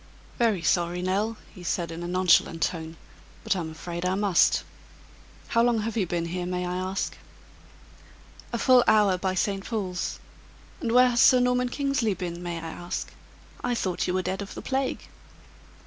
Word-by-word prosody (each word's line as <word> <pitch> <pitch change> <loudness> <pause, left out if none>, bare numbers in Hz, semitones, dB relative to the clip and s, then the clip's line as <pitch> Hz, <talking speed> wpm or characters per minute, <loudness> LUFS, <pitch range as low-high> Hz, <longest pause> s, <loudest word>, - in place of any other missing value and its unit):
"Very 220 -7 +2
sorry, 175 +2 +1
Nell," 205 +4 0 0.2
he 180 - -12
said, 170 -1 -2
in 165 +1 -6
a 175 - -4
nonchalant 175 -2 +3
tone, 160 -1 -3 0.5
"but - - +1
I'm 170 -4 -3
afraid 170 +2 -6
I 185 +1 +1
must. 200 -3 +3 0.9
How 230 - +3
long 235 -2 +2
have 225 +2 -3
you 200 -5 0
been 170 0 -1
here, 175 +1 -3
may 180 0 -2
I 180 0 -3
ask?" 185 +1 -2 1.4
"A 235 - -1
full 250 +1 +5
hour 205 -4 +4
by 185 0 -1
St. 195 +1 0
Paul's; 190 -6 -3 0.6
and 230 - -2
where 250 +1 +6
has 240 -1 +2
Sir 255 - +7
Norman 250 0 +2
Kingsley 275 -6 0
been, 175 -1 -5
may 175 -1 -4
I 165 0 -6
ask? 175 +1 -5 0.5
I 245 -1 0
thought 185 -6 -1
you 180 - 0
were 185 - 0
dead 190 +2 -2
of 200 - -7
the - - -7
plague." 265 0 -1
185 Hz, 180 wpm, -26 LUFS, 175-230 Hz, 1.4 s, Sir